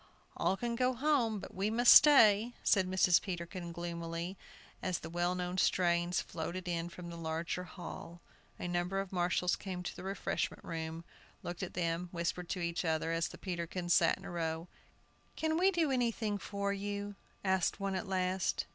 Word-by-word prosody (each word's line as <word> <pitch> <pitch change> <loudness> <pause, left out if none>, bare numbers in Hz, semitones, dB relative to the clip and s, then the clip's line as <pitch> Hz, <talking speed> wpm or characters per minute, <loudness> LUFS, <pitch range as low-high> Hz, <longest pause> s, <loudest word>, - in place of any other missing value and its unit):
"All 195 - +1
can 235 +1 -2
go 255 +1 +1
home, 255 -5 +2
but - - -8
we 195 +3 0
must 240 +2 +7
stay," 235 -5 +7
said 190 -3 +3
Mrs. 185 -2 +4
Peterkin, 175 -1 -5
gloomily, 170 +1 -4 0.5
as 185 -2 -1
the 160 - -8
well 175 +1 0
known 180 0 -2
strains 175 -1 +2
floated 175 +3 -5
in 170 -1 -2
from 175 -1 -8
the - - -7
larger 165 +2 -3
hall. 175 0 -8 0.4
A - - -4
number 175 +2 -1
of 195 -1 -4
marshals 180 0 +1
came 185 -2 -6
to - - -5
the - - -8
refreshment 195 0 -2
room, 165 0 -5 0.4
looked 175 +2 -5
at 185 - -5
them, 170 0 -1
whispered 170 0 -3
to 180 - -2
each 170 +1 -1
other, 160 -1 0
as 165 0 +1
the - - -10
Peterkins 175 -1 -2
sat 165 - +4
in - - -13
a - - -6
row. 165 0 -2 0.7
"Can 315 0 0
we 365 +4 +4
do 335 -6 +1
anything 230 -5 0
for 200 0 -2
you?" 205 0 -4 0.3
asked 190 -2 +1
one 195 -1 -1
at 190 +2 -3
last. 185 -1 0
180 Hz, 180 wpm, -33 LUFS, 170-200 Hz, 0.7 s, must